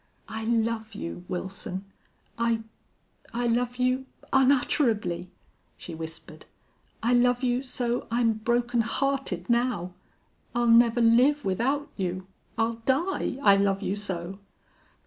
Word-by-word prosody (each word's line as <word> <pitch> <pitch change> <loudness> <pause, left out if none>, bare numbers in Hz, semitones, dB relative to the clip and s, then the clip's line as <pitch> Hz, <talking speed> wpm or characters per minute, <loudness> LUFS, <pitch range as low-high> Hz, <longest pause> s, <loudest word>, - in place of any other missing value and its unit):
"I 220 0 -5
love 225 -1 0
you, 175 -2 -6
Wilson! 190 +1 -5 0.5
I 230 -1 +1 0.7
I 240 +1 0
love 240 +1 +1
you 255 +1 +1 0.3
unutterably," 245 - +2 0.6
the 170 - -7
whispered. 160 0 -8 0.6
"I 240 +2 +3
love 245 +1 +3
you 245 0 +1
so 245 -2 -2
I'm 230 -1 +2
broken 235 +2 +1
hearted 245 -6 -1
now. 235 -7 0 0.6
I'll 240 0 +2
never 235 0 +5
live 250 +4 +4
without 265 +10 0
you. 185 -1 -3 0.3
I'll 225 0 0
die 280 +1 0
I 200 -1 +7
love 195 0 +1
you 195 - -1
so!" 190 -2 -4
230 Hz, 120 wpm, -27 LUFS, 195-245 Hz, 0.7 s, I